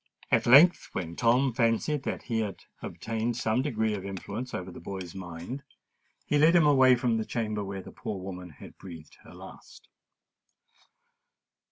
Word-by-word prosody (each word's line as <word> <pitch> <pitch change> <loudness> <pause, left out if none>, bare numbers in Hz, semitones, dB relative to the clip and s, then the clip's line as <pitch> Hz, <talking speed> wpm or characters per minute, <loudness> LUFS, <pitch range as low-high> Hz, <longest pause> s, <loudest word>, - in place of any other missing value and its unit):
At - - +3
length, 150 +9 +7
when 85 -2 -4
Tom 125 +4 +2
fancied 115 +5 +1
that - - -3
he 115 -2 -2
had 105 -4 -4 0.2
obtained 115 +1 -3
some 115 +1 +1
degree 110 -6 -1
of 100 -2 -4
influence 100 +6 -6
over 90 0 -5
the - - -10
boy's 90 -1 -7
mind, 90 +8 -7 0.6
he 145 - +1
led 160 +4 +5
him 170 -3 +6
away 130 -3 +6
from 120 -2 0
the 110 - -1
chamber 110 -3 -3
where 95 -1 -6
the - - -11
poor 100 -3 -6
woman 90 -1 -7
had 75 - -14
breathed 85 -5 -11
her - - -14
last. - - -13
110 Hz, 165 wpm, -28 LUFS, 95-125 Hz, 0.6 s, length